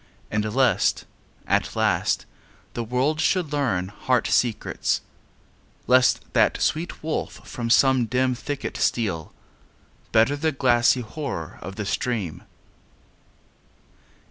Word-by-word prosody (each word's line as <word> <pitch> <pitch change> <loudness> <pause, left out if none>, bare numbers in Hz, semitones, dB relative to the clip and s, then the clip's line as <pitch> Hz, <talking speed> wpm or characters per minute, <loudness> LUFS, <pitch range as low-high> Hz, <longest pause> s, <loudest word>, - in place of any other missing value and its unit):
And 105 0 0
lest, 130 -2 +2 0.4
at - - 0
last, - - +1 0.5
the 120 - -3
world 130 +7 0
should 175 -6 +1
learn 100 -11 0
heart 125 +4 0
secrets; 120 -4 0 0.8
Lest 125 0 +4
that - - +3
sweet 160 +1 -1
wolf 160 0 -4
from 120 -5 -4
some 130 0 +4
dim 125 +2 +1
thicket 140 +3 -5
steal; 95 -9 -1 0.8
Better 115 +6 +4
the 160 +2 0
glassy 125 -2 +3
horror 110 - -6
of 95 - -7
the 105 - -4
stream. 100 -5 -2
125 Hz, 110 wpm, -24 LUFS, 110-140 Hz, 0.8 s, Lest